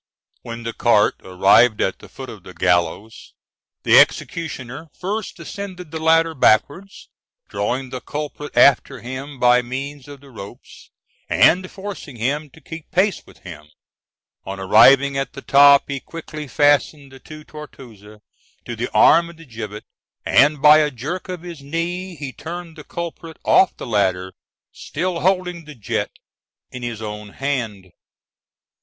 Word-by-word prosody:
When 115 0 -8
the 115 0 -4
cart 110 -3 +2
arrived 100 +5 +4
at 95 - -1
the - - -14
foot 130 -2 -9
of 105 - -12
the 90 - -13
gallows, 90 +4 -1 0.5
the - - +7
executioner 155 -2 -1
first 205 +1 -4
ascended 180 -1 -8
the 160 - -5
ladder 165 +1 +3
backwards, 150 - +1 0.4
drawing 130 0 -3
the 130 - -6
culprit 150 0 -7
after 135 -2 +4
him 130 +3 -7
by 125 0 +5
means 135 +3 -7
of 145 -1 -12
the 140 -1 -16
ropes, 100 -4 -12 0.4
and 185 +1 +4
forcing 195 -8 -8
him 145 +6 -2
to 160 - -18
keep 160 0 -10
pace 190 +3 +1
with - - -19
him; 75 -4 -11 0.8
on 95 0 -7
arriving 135 +8 +5
at 135 - -4
the 140 - -10
top, 140 0 +6
he 140 -1 -4
quickly 155 0 -9
fastened 145 0 +1
the 135 - -13
two 155 +2 -12
tortouses 115 -9 -13 0.4
to - - -5
the - - -4
arm 170 +1 +5
of 170 - -14
the 165 - -14
gibbet, 110 -3 -8 0.4
and 145 0 +3
by 150 +1 +8
a 150 -1 +2
jerk 150 +10 -6
of 180 -2 -6
his 170 -5 -9
knee 175 +5 -4
he 140 -4 -7
turned 170 0 -8
the 155 - -11
culprit 165 -1 -7
off 190 - +4
the - - -7
ladder, 95 -5 0 0.4
still 175 +2 -4
holding 180 -3 -1
the 150 -1 -11
jet 110 -5 -3 0.6
in 125 - -8
his 115 -2 -5
own 105 -1 -7
hand. 115 -9 -4
140 Hz, 155 wpm, -20 LUFS, 115-165 Hz, 0.8 s, by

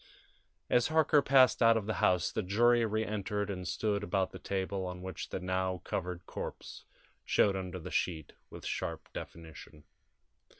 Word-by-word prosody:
As 120 -1 +3
Harker 155 -2 +4
passed 130 -4 +5
out 115 -1 +6
of 110 - -2
the 110 - -1
house 90 -2 +3
the 110 - -1
jury 120 +5 +3
reentered 105 -1 -2
and 90 -2 -5
stood 105 0 0
about 95 -1 0
the - - -9
table 95 0 -2
on 90 0 -7
which 95 0 -6
the - - -3
now 95 0 -1
covered 90 -1 -4
corpse - - -7 0.4
showed 100 -2 +3
under 95 -1 -4
the 85 - -8
sheet 80 -4 -2 0.2
with - - -10
sharp - - -4
definition. 80 -2 -10
95 Hz, 160 wpm, -32 LUFS, 90-110 Hz, 0.4 s, out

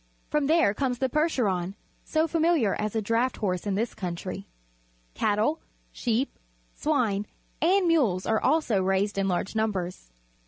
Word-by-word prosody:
From 300 -2 +1
there 305 -11 +4
comes 250 +1 -1
the 265 +1 0
Percheron, 210 - 0 0.3
so 315 +1 +1
familiar 320 - +2
as 215 0 -2
a 220 - 0
draft 230 +4 +1
horse 185 -1 -2
in 200 - 0
this 225 +4 -1
country. 185 +2 -5 0.7
Cattle, 215 - +1 0.3
sheep, 240 +3 -1 0.3
swine, 225 -9 0 0.3
and 370 +2 +3
mules 240 - +2
are 220 0 +1
also 260 -8 +2
raised 195 +2 +1
in 195 - +1
large 185 +3 -1
numbers. 190 - -2
220 Hz, 145 wpm, -27 LUFS, 195-295 Hz, 0.7 s, there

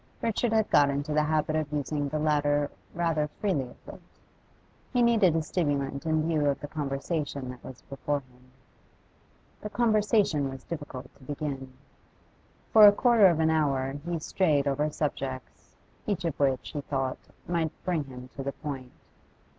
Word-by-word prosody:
Richard 230 +1 0
had 220 -1 +3
got 145 -1 +6
into 140 +2 -2
the 150 - +4
habit 155 0 0
of 155 -2 -1
using 145 0 -1
the 155 - -2
latter 145 -1 +1 0.2
rather 165 -3 +1
freely 170 -12 0
of - - -16
late. - - -10 0.9
He 245 -2 +3
needed 220 -8 +4
a 160 - +1
stimulant 145 -3 -1
in 155 0 +1
view 155 -3 +1
of 140 -1 +1
the 145 - -6
conversation 140 -2 -3
that 125 - -12
was 130 -1 -10
before 140 +1 -3
him. 125 -1 -23 1.1
The 210 - -5
conversation 210 - +2
was 135 -1 -8
difficult 145 -6 -7
to 140 - -20
begin. 135 -1 -5 1.0
For 215 -1 +10
a - - +10
quarter 230 -1 +5
of 170 -3 +2
an 160 0 +3
hour 135 -4 +1
he 170 0 -2
strayed 155 -3 +1
over 145 +2 +1
subjects, 135 -4 -5 0.3
each 200 -5 -1
of 165 -4 -2
which, 135 -2 +1
he 145 - -3
thought, 135 -2 -2 0.3
might 165 -3 0
bring 170 -5 0
him 125 -1 -10
to 135 - -8
the 140 0 -3
point. 135 -4 -6
150 Hz, 165 wpm, -28 LUFS, 135-165 Hz, 1.1 s, For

